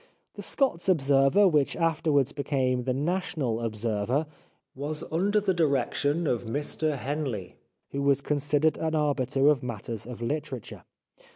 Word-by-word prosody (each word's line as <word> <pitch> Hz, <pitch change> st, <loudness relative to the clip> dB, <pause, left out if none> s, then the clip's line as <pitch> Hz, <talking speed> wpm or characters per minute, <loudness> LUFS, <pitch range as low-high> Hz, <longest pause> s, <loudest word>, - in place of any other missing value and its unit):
The -, -, -8 dB
Scots 225 Hz, -, 0 dB
Observer, 140 Hz, +4 st, +4 dB
which 150 Hz, -6 st, +2 dB
afterwards 155 Hz, -5 st, +1 dB
became 130 Hz, -3 st, -1 dB
The 130 Hz, -, +1 dB
National 150 Hz, -6 st, -1 dB
Observer, 115 Hz, +5 st, -1 dB, 0.5 s
was 145 Hz, +3 st, -4 dB
under 200 Hz, +6 st, +2 dB
the 200 Hz, -2 st, +1 dB
direction 145 Hz, 0 st, +1 dB
of 120 Hz, -5 st, 0 dB
Mr 145 Hz, +4 st, -1 dB
Henley, 135 Hz, -, -4 dB, 0.3 s
who 140 Hz, -, -2 dB
was 140 Hz, -1 st, +3 dB
considered 145 Hz, +2 st, +1 dB
an 160 Hz, 0 st, -1 dB
arbiter 140 Hz, -2 st, +1 dB
in 145 Hz, -, +1 dB
matters 115 Hz, -2 st, -6 dB
of 125 Hz, -2 st, -7 dB
literature. 130 Hz, -1 st, -4 dB
145 Hz, 130 wpm, -27 LUFS, 130-155 Hz, 0.5 s, Observer